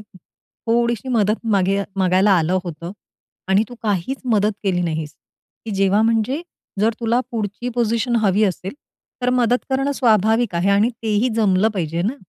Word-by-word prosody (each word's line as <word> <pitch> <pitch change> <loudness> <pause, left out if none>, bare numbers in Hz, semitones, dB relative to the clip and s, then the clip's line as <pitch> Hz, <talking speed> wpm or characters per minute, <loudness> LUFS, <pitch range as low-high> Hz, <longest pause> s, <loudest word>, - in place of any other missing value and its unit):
थोडीशी 230 +5 -4
मदत 220 -1 0
मागेय 195 0 +2
मागायला 190 +2 +3
आलं 175 +3 +1
होतं 170 +1 -7 0.6
आणि 195 +3 +3
तू 245 - -10
काहीच 210 +5 -1 0.2
मदत 210 +1 +2
केली 180 -3 0
नाहीस." 160 -2 -3 0.5
की 225 - -5
जेव्हा 195 +2 +2
म्हणजे 230 +7 0 0.4
"जर 220 +1 +2
तुला 235 +2 +1
पुढची 220 +1 -4
पोझिशन 235 +1 0
हवी 205 +1 +3
असेल, 190 - -3 0.5
तर 250 - +2
मदत 245 -1 +1
करणं 270 +2 0
स्वाभाविक 220 -4 +2
आहे 180 +4 +1
आणि 205 +4 +3
तेही 220 +2 +1
जमलं 205 -1 +3
पाहिजे 170 -2 -2
ना, 220 +8 -1
210 Hz, 150 wpm, -20 LUFS, 190-235 Hz, 0.6 s, मागायला